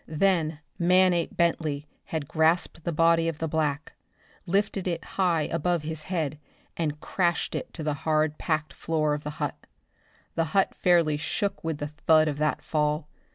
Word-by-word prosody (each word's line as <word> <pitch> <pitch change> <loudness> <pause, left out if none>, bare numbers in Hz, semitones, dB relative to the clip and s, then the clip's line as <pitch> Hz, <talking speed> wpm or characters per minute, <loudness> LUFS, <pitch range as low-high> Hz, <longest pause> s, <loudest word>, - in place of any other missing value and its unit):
Then 160 -2 +1 0.2
Manape 180 0 +3
Bentley 155 -4 +1 0.2
had 160 -7 -4
grasped 160 +1 +1
the 170 - 0
body 165 +1 +3
of 165 -2 -2
the 160 - -2
black, 150 -1 -1 0.5
lifted 195 +1 0
it 170 -2 -2
high 175 -5 +1
above 165 +1 0
his 160 0 -4
head, 155 -4 -2 0.4
and 150 -3 -2
crashed 175 0 0
it - - -4
to 160 - -4
the 150 -1 0
hard 155 -1 +1
packed 155 0 -1
floor 155 -2 0
of 150 0 -3
the 150 - -4
hut. - - -4 0.7
The 165 - +1
hut 195 - +3
fairly 170 -4 +3
shook 195 +6 -2
with 160 -2 -2
the 145 0 -4
thud 155 +1 +3
of 145 -1 -2
that 155 0 0
fall. 150 0 0
160 Hz, 165 wpm, -27 LUFS, 150-170 Hz, 0.7 s, Manape